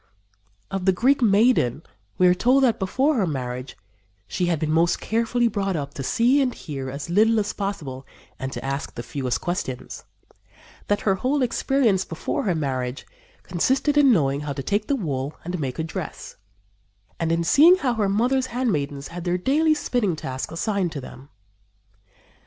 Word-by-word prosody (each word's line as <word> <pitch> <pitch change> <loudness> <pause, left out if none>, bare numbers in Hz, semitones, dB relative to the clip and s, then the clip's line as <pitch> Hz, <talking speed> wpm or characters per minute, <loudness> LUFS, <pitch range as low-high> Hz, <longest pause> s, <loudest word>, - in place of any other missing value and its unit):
Of 195 -2 -3
the 190 - +5
Greek 255 +9 +2
maiden 205 - +3 0.3
we 185 - +4
are 180 - +6
told 255 +9 +3
that, 240 -4 +2
before 265 +9 +1
her 195 -5 +1
marriage 125 -3 -5 0.5
she 180 - -1
"had 170 -2 +1
been 155 +1 -2
most 165 +2 +2
carefully 235 +2 +1
brought 195 -3 -1
up 145 -3 -4
to - - -6
see 245 - +3
and 255 -2 0
hear 135 -5 -6
as 140 +5 -6
little 220 +4 +4
as 205 -1 -2
possible 150 -10 -5 0.3
and 130 0 -4
to - - -6
ask 135 +1 -4
the 120 - -5
fewest 130 0 -3
questions"; 175 -8 -4 0.8
that 205 - +1
her 195 - +2
whole 260 +8 0
experience 235 -5 +1
before 165 +5 -3
her 185 -4 +1
marriage 130 -4 -3 0.4
"consisted 265 - +1
in 285 -3 +6
knowing 140 - +2
how 150 -1 -4
to 135 0 -5
take 205 +7 -1
the 285 - +1
wool 145 - -3
and 175 +1 -3
make 135 -4 -3
a 160 - -1
dress, 160 - -6 0.8
and 165 -1 0
in 165 0 +1
seeing 310 - +7
how 275 -9 0
her 210 -4 0
mother's 250 +6 +1
handmaidens 145 - -2
had 175 0 -7
their 175 0 0
daily 310 - +2
spinning 245 - 0
tasks 130 -3 -5
assigned 190 0 -1
to 150 - -5
them." 135 +1 -11
185 Hz, 175 wpm, -23 LUFS, 145-235 Hz, 0.8 s, seeing